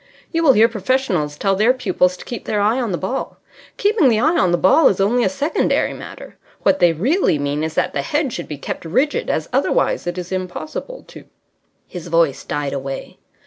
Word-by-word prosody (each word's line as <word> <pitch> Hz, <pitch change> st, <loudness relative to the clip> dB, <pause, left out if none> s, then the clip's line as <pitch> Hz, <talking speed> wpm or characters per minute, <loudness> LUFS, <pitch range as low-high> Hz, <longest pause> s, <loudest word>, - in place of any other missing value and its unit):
You 330 Hz, -, 0 dB
will 295 Hz, -5 st, +6 dB
hear 225 Hz, 0 st, +5 dB
professionals 200 Hz, -, -1 dB
tell 195 Hz, -1 st, +1 dB
their 225 Hz, +6 st, +3 dB
pupils 185 Hz, -6 st, +1 dB
to -, -, -12 dB
keep 240 Hz, -, -7 dB
their 210 Hz, -, -1 dB
eye 220 Hz, +5 st, +2 dB
on 235 Hz, -4 st, -2 dB
the 175 Hz, -, -1 dB
ball. 250 Hz, +10 st, -4 dB, 0.4 s
Keeping 410 Hz, -, +3 dB
the 220 Hz, -2 st, +2 dB
eye 310 Hz, +8 st, +2 dB
on 180 Hz, -, +2 dB
the 175 Hz, -, +2 dB
ball 230 Hz, -, +5 dB
is 195 Hz, -, +1 dB
only 235 Hz, +5 st, +2 dB
a -, -, +2 dB
secondary 285 Hz, +2 st, 0 dB
matter. -, -, -11 dB, 0.3 s
What 195 Hz, -1 st, +3 dB
they 175 Hz, -2 st, +5 dB
really 235 Hz, -, +1 dB
mean 145 Hz, +1 st, -2 dB
is 160 Hz, 0 st, -4 dB
that -, -, 0 dB
the 140 Hz, -, -1 dB
head 280 Hz, -, -1 dB
should 175 Hz, -, -5 dB
be 150 Hz, -, -6 dB
kept -, -, -6 dB
rigid, 280 Hz, -, 0 dB
as -, -, -1 dB
otherwise -, -, +1 dB
it 175 Hz, +1 st, -3 dB
is 180 Hz, 0 st, -6 dB
impossible 190 Hz, -, -5 dB
to -, -, -12 dB, 0.3 s
" -, -, -47 dB, 0.2 s
His 175 Hz, -2 st, -8 dB
voice 165 Hz, -4 st, +1 dB
died 145 Hz, -1 st, -3 dB
away. 135 Hz, 0 st, -6 dB
195 Hz, 215 wpm, -19 LUFS, 170-265 Hz, 0.4 s, will